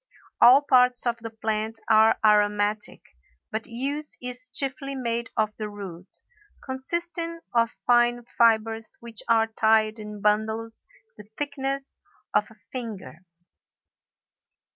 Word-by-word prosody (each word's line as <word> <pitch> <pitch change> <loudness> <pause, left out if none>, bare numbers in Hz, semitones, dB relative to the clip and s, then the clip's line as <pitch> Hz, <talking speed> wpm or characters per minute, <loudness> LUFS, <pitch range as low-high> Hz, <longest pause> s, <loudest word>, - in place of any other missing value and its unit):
All 260 +4 +8
parts 250 -3 +4
of 240 -1 0
the 225 0 -7
plant 220 0 -3
are 220 0 +5
aromatic, 210 0 +2 0.5
but 220 +1 -3
use 280 +6 -4
is 250 0 -7
chiefly 275 +1 -4
made 235 -2 -2
of 215 -1 +1
the 215 -1 -4
root, 190 -3 -9 0.6
consisting 335 +5 -4
of 230 -1 +3 0.2
fine 240 0 +3
fibres 225 -1 +1
which 235 -2 -10
are 225 -1 +5
tied 220 0 +2
in 210 -1 -8
bundles 220 +2 -1 0.3
the 210 - -13
thickness 275 -1 -4 0.3
of - - +2
a - - -17 0.2
finger. 220 - -6
230 Hz, 120 wpm, -25 LUFS, 215-255 Hz, 0.6 s, All